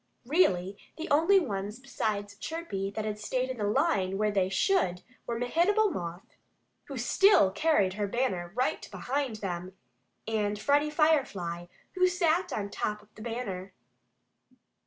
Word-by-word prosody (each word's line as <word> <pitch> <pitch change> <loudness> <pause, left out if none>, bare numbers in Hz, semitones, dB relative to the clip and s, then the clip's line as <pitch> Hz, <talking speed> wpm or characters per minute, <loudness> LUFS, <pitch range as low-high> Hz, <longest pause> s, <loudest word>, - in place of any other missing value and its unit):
Really, 200 - +2 0.2
the 325 - -5
only 330 +7 +5
ones 205 - -3
besides 210 -6 -3
Chirpy 210 - -4
that 215 +2 -4
had 210 -1 -3
stayed 255 +4 -1
in 255 - -6
the 210 - -1
line 195 -2 +1
as 210 -1 +1
they 190 -2 +2
should 190 - +1 0.2
were 235 - -2
Mehitable 365 - +2
Moth, 175 - -6 0.5
who - - -7
still 390 - +5
carried 205 -8 +2
her 205 0 -2
banner 195 -7 -1
right 255 +1 -1
behind 265 -3 -2
him, 185 -2 -5 0.5
and 210 -2 0
Freddie 285 +7 +2
Firefly, 260 - +1 0.2
who 365 0 +3
sat 355 -1 +1
on 200 -1 -3
top 210 0 -3
of 210 - -26
the - - -13
banner. 205 -5 -5
215 Hz, 145 wpm, -29 LUFS, 195-300 Hz, 0.5 s, only